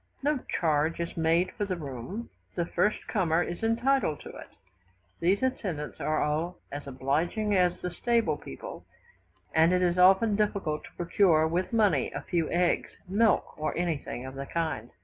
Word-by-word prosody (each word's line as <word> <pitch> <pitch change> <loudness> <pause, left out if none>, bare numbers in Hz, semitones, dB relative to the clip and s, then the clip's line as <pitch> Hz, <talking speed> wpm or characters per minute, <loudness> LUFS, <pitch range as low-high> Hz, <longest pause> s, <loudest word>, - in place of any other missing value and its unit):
No 290 -1 +2 0.2
charge 160 0 +1
is 170 0 -3
made 165 +3 +2
for 205 - -3
the 190 -2 -2
room, 155 - -6 0.2
the 175 - 0
first 195 +5 0
comer 175 -4 +2
is 175 +2 -5
entitled 230 - +1
to - - -9
it. - - -10 0.7
These 190 +7 +2
attendants 190 - -2
are 155 +3 0 0.2
as 145 0 -6
obliging 160 - 0
as 180 -1 +2
the 180 - -3
stable 230 -4 +1
people, 65 - -9 0.7
and 160 +2 +5
it 180 0 +2
is 175 0 +2
often 195 +4 +6
difficult 200 -7 -1
to - - -15
procure 170 -2 +3
with 175 +3 -1
money 205 - +2
a - - -3
few 165 -3 -1
eggs, 175 0 +1 0.2
milk, 215 +4 +2
or 155 0 -2
anything 160 -7 -2
of 130 - -7
the 135 0 -6
kind. 155 -9 -2
175 Hz, 165 wpm, -28 LUFS, 155-200 Hz, 0.7 s, often